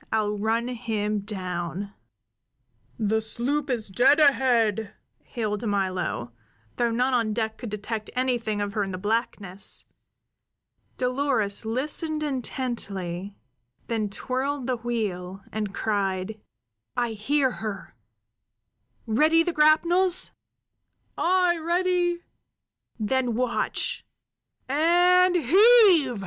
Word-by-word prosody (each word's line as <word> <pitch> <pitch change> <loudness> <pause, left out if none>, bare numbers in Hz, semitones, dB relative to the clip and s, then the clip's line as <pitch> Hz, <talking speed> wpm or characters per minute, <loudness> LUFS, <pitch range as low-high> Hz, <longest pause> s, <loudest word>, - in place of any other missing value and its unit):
I'll 210 -1 0
run 225 +3 0
him 215 -4 -2
down!" 190 -1 -5 1.0
"The 220 0 +1
sloop 275 +6 -2
is 235 -4 -2
dead 250 +10 +4
ahead!" 235 -7 +3 0.3
hailed 220 -1 -3
Milo, 185 - -2 0.5
though 240 -1 +2
none 250 +3 +1
on 230 -3 +1
deck 220 0 -2
could 240 - -6
detect 210 +1 -5
anything 240 -5 0
of 205 -1 -3
her 210 - 0
in 195 - -4
the 185 - -4
blackness. 205 -2 -2 1.1
Dolores 250 -5 0
listened 305 +6 -1
intently; 205 - -3 0.5
then 220 -3 -1
twirled 260 +5 -3
the 255 -1 -1
wheel, 200 -5 -4
and 210 -2 -3
cried: 200 0 -2 0.6
"I 240 -1 0
hear 260 +5 +1
her! 215 -3 -5 1.1
Ready 310 +9 +3
the 350 0 -2
grapnels?" 340 +4 +3 0.8
"Aye, 360 -1 +2
ready!" 350 +1 0 0.8
"Then 245 +2 0
watch 250 0 -1 0.6
and 355 +5 +4
heave!" 355 - +5
235 Hz, 100 wpm, -25 LUFS, 210-290 Hz, 1.1 s, heave